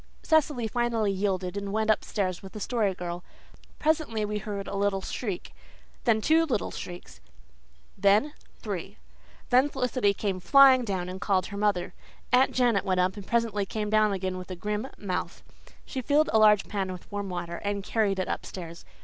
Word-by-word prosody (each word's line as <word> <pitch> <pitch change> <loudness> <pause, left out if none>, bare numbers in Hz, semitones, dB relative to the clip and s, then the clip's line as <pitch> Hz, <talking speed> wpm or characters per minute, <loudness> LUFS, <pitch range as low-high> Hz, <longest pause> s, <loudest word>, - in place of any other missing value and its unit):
Cecily 295 -7 +2
finally 230 -2 0
yielded 190 -2 -1
and 200 -1 -4
went 220 +1 +2
upstairs 190 -4 -1
with 190 - -11
the 215 - -6
Story 210 -4 0
Girl. 175 0 -5 0.5
Presently 300 -9 0
we 210 0 -2
heard 205 -1 -5
a - - -5
little 200 -1 0
shriek 200 -8 -4 0.5
then 220 -3 +3
two 320 +7 +4
little 245 -9 -1
shrieks 175 - -9 0.7
then 210 +9 +3 0.2
three. - - -6 0.5
Then 255 +4 +5
Felicity 250 -6 +1
came 195 -3 -2
flying 265 +5 +7
down 190 -4 -2
and 185 +1 -7
called 190 -3 +1
her - - -4
mother. 200 -4 0 0.4
Aunt 255 +2 +5
Janet 240 -6 +2
went 185 -1 0
up 185 +1 +2
and 205 -2 -9
presently 230 -3 +1
came 210 0 -3
down 215 -1 +4
again 185 -1 -2
with 180 - -9
a 185 - -4
grim 210 +6 -3
mouth. 190 -3 -4 0.4
She 260 - -4
filled 295 +4 +2
a 220 - +5
large 210 -2 +5
pan 195 -3 -2
with 180 -1 -10
warm 200 -1 -3
water 175 -1 -4
and 200 -1 -3
carried 205 -2 0
it 185 - -1
upstairs. 170 -3 -6
205 Hz, 175 wpm, -27 LUFS, 190-230 Hz, 0.7 s, flying